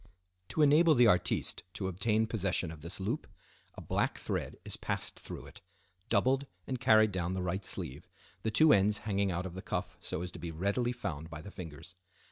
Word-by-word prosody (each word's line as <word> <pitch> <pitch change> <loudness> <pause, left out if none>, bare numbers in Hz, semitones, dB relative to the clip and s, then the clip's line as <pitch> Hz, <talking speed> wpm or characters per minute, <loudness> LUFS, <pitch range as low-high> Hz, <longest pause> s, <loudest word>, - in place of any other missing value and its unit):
To 155 - +2
enable 155 +2 +6
the 125 -1 +6
artiste 90 -6 +2
to 95 - -2
obtain 105 +4 +1
possession 95 -6 0
of 80 -2 -10
this 85 +4 -7
loop, 110 +10 -2 0.5
a - - -8
black - - 0
thread - - -3
is - - -2
passed - - -3
through - - -8
it, - - -13 0.5
doubled 135 +2 +3 0.2
and 130 -1 -3
carried 110 -4 +5
down 90 -1 -1
the 95 - -2
right 95 +2 -2
sleeve, 85 -10 -5 0.3
the 110 - 0
two 155 +8 +6
ends 100 +1 +4
hanging 100 -2 +1
out 90 +1 -2
of 90 - -5
the 95 - -6
cuff - - -3
so 85 - -3
as 90 - -5
to - - -10
be 85 - -4
readily 100 +9 0
found 80 -10 -5
by 80 -1 -8
the 100 - -9
fingers. 80 -1 -9
95 Hz, 200 wpm, -32 LUFS, 85-115 Hz, 0.5 s, enable